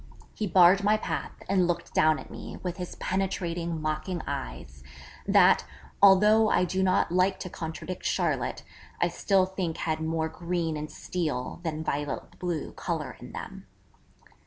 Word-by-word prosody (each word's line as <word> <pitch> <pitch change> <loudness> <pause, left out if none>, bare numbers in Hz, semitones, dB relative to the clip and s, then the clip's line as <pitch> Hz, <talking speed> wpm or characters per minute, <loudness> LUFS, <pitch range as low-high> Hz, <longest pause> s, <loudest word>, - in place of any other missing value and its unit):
He 215 - -2
barred 185 +2 +6
my 210 +1 +4
path - - -5
and 185 -2 +3
looked 175 -1 -2
down 155 -1 +4
at - - -10
me - - -8
with 180 0 -3
his 180 -1 -6
penetrating, 175 -3 -2
mocking 155 +3 -2
eyes, 65 +2 -6 0.4
that, - - +6 0.4
although 210 +3 +6
I 180 - +3
do 185 +2 -1
not 185 -2 +2
like 185 +1 +2
to 185 - -6
contradict 165 +3 -6
Charlotte, - - -1 0.4
I - - +2
still 195 -2 +2
think 185 -3 -3
had 160 -1 -1
more 160 0 0
green 170 -1 -2
and 150 0 -5
steel, 155 -8 -3
than 160 -2 -3
violet 145 -2 -4
blue, 175 -4 -3
colour - - -4
in - - -10
them. - - -8
175 Hz, 155 wpm, -28 LUFS, 160-190 Hz, 0.4 s, barred